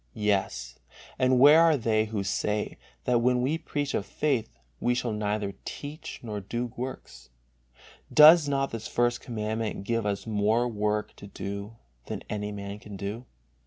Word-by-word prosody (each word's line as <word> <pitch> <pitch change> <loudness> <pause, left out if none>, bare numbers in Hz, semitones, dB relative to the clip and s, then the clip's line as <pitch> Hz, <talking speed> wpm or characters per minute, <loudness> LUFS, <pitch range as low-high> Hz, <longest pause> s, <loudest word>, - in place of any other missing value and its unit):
Yes, 95 -13 -1 0.4
and 130 0 +4
where 145 +5 +8
are 165 -3 +5
they 110 -3 +1
who 105 -2 -3
say 105 +2 -2 0.2
that 120 -1 +2
when 125 0 +2
we 150 +5 0
preach 145 -3 -3
of - - 0
faith, 135 -1 -1 0.3
we 120 0 +1
shall 125 -1 -1
neither 105 -1 -2
teach 150 +2 -7
nor 105 -3 -4
do 120 +4 -4
works? 130 - -7 0.8
Does 155 0 +8
not 135 -1 0
this 115 -1 -5
First 120 0 +1
Commandment 110 -2 -3
give 115 0 -1
us 100 -1 -2
more 110 +2 +1
work 105 -2 -1
to 100 - -10
do 100 +2 -6 0.3
than - - -5
any 105 0 -3
man 100 0 -6
can 105 -1 -9
do? 105 +6 -5
110 Hz, 160 wpm, -28 LUFS, 105-125 Hz, 0.8 s, where